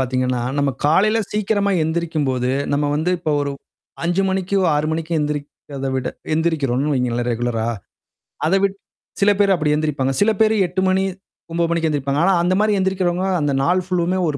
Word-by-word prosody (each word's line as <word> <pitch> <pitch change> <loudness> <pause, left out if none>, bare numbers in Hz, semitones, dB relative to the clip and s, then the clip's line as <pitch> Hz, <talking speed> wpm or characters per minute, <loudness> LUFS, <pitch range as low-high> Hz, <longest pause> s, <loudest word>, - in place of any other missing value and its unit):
பாத்தீங்கன்னா, 130 -1 0 0.2
நம்ம 140 -1 +2
காலையில 210 +9 +3
சீக்கிரமா 205 -1 0
எந்திரிக்கும்போது, 155 -6 -1 0.2
நம்ம 145 +1 +1
வந்து 160 +4 0
இப்ப 160 -3 -2
ஒரு 140 -1 -2 0.5
5:00 175 +3 +1
மணிக்கு, 190 +1 -1 0.2
6:00 150 +1 0
மணிக்கு 165 +1 -3
எந்திரிக்கத 145 -2 -4
விட 130 -1 -1 0.3
எந்திரிக்கிறோம்னு 150 -4 0
வைங்களேன், 120 -1 -1
ரெகுலரா. 115 -1 -1 0.8
அத 165 - +1
விட் 195 0 +1 0.5
சில 205 +1 +5
பேரு 200 -1 +4
அப்படி 150 -3 +1
எந்திரிப்பாங்க. 145 -3 -1
சில 215 +2 +4
பேரு 220 0 +4
மணி 195 - +3
8:00 180 +2 -2
மணி 190 +1 +2 0.5
9:00 170 0 0
மணிக்கு 165 -1 +1
எந்திரிப்பாங்க. 140 -1 -1
ஆனா 195 - +4
அந்த 180 - +2
மாரி 215 0 +2
எந்திரிக்கிறவங்க 185 -1 0 0.2
அந்த 145 -1 0
நாள் 180 +5 +2
ஃபுல்லுமே 180 0 0
ஒரு 145 - -3
160 Hz, 165 wpm, -20 LUFS, 140-185 Hz, 0.8 s, சில